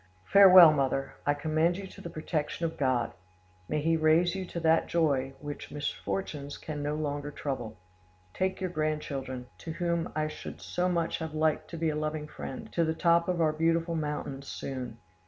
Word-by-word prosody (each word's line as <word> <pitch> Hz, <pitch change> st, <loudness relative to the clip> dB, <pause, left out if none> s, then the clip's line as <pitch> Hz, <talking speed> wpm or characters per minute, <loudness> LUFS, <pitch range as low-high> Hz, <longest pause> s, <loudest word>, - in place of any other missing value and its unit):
Farewell, 185 Hz, -5 st, +9 dB
mother: 135 Hz, -1 st, 0 dB
I 145 Hz, -, +3 dB
commend 155 Hz, +4 st, +1 dB
you 195 Hz, -, -6 dB
to 190 Hz, -, -12 dB
the 170 Hz, -, -6 dB
protection 155 Hz, +1 st, -2 dB
of 165 Hz, -, -3 dB
God; 130 Hz, -4 st, +1 dB, 0.6 s
may 150 Hz, -, 0 dB
He 165 Hz, +1 st, +3 dB
raise 160 Hz, +2 st, +4 dB
you 190 Hz, -1 st, -3 dB
to 170 Hz, -, -5 dB
that 165 Hz, 0 st, +3 dB
joy 135 Hz, -5 st, +1 dB
which 145 Hz, 0 st, -6 dB
misfortunes 145 Hz, -1 st, -4 dB
can 150 Hz, -2 st, -5 dB
no 145 Hz, +1 st, -1 dB
longer 145 Hz, -1 st, -3 dB
trouble! 130 Hz, -7 st, -5 dB, 0.6 s
Take 190 Hz, 0 st, -1 dB
your 185 Hz, -2 st, -2 dB
grandchildren, 145 Hz, -5 st, -3 dB
to 160 Hz, -, -6 dB
whom 170 Hz, -1 st, -1 dB
I 155 Hz, 0 st, 0 dB
should 155 Hz, -, -8 dB
so 180 Hz, +1 st, -1 dB
much 170 Hz, -2 st, 0 dB
have 160 Hz, -2 st, -5 dB
liked 155 Hz, 0 st, +1 dB
to 170 Hz, -, -6 dB
be 165 Hz, 0 st, +1 dB
a -, -, -3 dB
loving 155 Hz, 0 st, -2 dB
friend, 135 Hz, -3 st, -7 dB
to 170 Hz, -, +2 dB
the 160 Hz, 0 st, 0 dB
top 170 Hz, 0 st, +3 dB
of 175 Hz, -2 st, 0 dB
our 155 Hz, -1 st, +3 dB
beautiful 165 Hz, +1 st, +1 dB
mountains 150 Hz, -3 st, -4 dB
soon. 125 Hz, -4 st, -5 dB
155 Hz, 185 wpm, -29 LUFS, 145-170 Hz, 0.6 s, Farewell